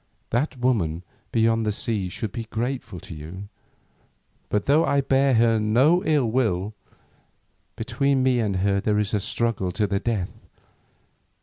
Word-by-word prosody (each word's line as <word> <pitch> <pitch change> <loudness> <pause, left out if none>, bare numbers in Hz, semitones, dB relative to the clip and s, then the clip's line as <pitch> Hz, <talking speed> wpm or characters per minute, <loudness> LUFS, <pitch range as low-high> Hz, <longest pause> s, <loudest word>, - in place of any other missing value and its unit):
That 130 +4 0
woman 95 -10 0 0.3
beyond 115 0 +2
the 105 - 0
seas 100 -3 -2
should 110 +1 -4
be 115 -2 -5
grateful 115 -4 -4
to - - -9
you, 85 +6 -9 1.0
but 105 -1 0
though 150 +4 +4
I 140 - +2
bear 135 -1 +3
her 115 -1 +4
no 130 +12 +3
ill 150 -5 +2
will, 110 -4 0 1.0
between 130 +4 0
me 130 -2 +3
and 105 -4 0
her 100 +1 +1
there 105 0 +1
is 105 0 -1
a 105 - +2
struggle 100 -2 -1
to 105 - +1
the 100 -1 0
death. 105 -6 -2
115 Hz, 150 wpm, -24 LUFS, 100-130 Hz, 1.0 s, though